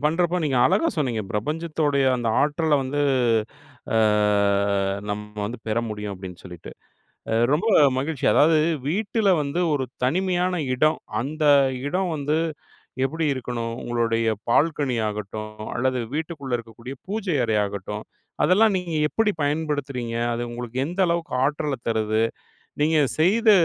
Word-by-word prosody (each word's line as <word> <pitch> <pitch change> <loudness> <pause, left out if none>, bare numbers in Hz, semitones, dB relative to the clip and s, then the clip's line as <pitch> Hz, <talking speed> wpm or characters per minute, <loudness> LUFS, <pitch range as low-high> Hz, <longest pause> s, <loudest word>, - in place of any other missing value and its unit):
பண்றப்போ 175 +3 +2
நீங்க 135 -4 0
அழகா 330 - +2
சொன்னீங்க. 125 -7 0
பிரபஞ்சத்தோடைய 150 +3 0
அந்த 115 -1 -1
ஆற்றல 150 +1 +2
வந்து 145 +2 -1 0.9
ஆ, - - +3 1.1
நம்ம 105 0 -6
வந்து 115 +4 -5
பெற 110 +2 +1
முடியும் 105 -1 -5
அப்படின்னு 90 -1 -9
சொல்லிட்டு. 90 -3 -10 0.6
ஏ - - +1 0.2
ரொம்ப 170 +10 +1 0.3
மகிழ்ச்சி 140 0 -2
அதாவது 160 +2 +5 0.3
வீட்ல 205 +4 0
வந்து 145 +4 -2
ஒரு 135 - 0 0.2
தனிமையான 180 +5 +1 0.2
இடம், 155 +4 +2 0.2
அந்த 155 +4 -3 0.4
இடம் 185 +3 -1
வந்து 150 +2 0 0.7
எப்டி 160 +4 -2
இருக்கணும்? 115 -3 -4
உங்களுடைய 115 -1 0 0.2
பால்கனி 145 -2 +2
ஆகட்டும் 105 +1 -6
அல்லது 130 0 0 0.2
வீட்டுக்குள்ள 145 -6 -3
இருக்கக்கூடிய 115 +4 -10
பூஜை 195 -5 -2
அறை 110 -2 +1
ஆகட்டும் 100 +1 -5 0.4
அதெல்லாம் 205 +3 +4
நீங்க 170 -3 -4
எப்படி 225 -2 +1
பயன்படுத்துறீங்க? 145 -6 -2 0.2
அது 120 +1 -2
உங்களுக்கு 120 +1 -6
எந்த 175 +4 -6
அளவுக்கு 170 -3 -2
ஆற்றல 145 -1 -1
தருது? 110 0 +1 0.6
நீங்க 160 +1 +3 0.2
செய்த 215 +7 +4
145 Hz, 125 wpm, -24 LUFS, 115-165 Hz, 1.1 s, அதாவது